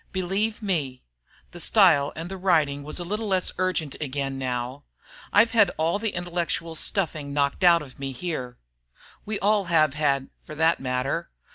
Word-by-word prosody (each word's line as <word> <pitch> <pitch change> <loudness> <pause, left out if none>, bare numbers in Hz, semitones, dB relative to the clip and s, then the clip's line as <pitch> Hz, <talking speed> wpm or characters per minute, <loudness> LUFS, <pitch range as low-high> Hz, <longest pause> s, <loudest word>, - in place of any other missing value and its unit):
Believe 195 +4 -1
me 150 -10 -1 0.5
(the 175 - -10
style 165 -8 +4
and 165 +2 -5
the 190 - -6
writing 160 -7 +1
was 150 +2 -6
a 175 - -3
little 210 +5 -3
less 190 -2 +1
urgent 180 -6 -1
again 135 -1 -3
now), 125 +1 -3 0.5
I've 225 +3 +5
had 220 -5 +5
all 165 +5 +1
the 220 -1 -2
intellectual 175 -1 -2
stuffing 155 -5 -1
knocked 140 +4 0
out 170 -2 +6
of 135 -2 -14
me 135 -1 -3
here. 130 -4 -5 0.7
We 215 -1 -2
all 205 0 +2
have 155 -4 +3
had, 140 -3 0
for 155 - -10
that 160 +2 +3
matter. 125 +1 -2
165 Hz, 165 wpm, -25 LUFS, 140-185 Hz, 0.7 s, out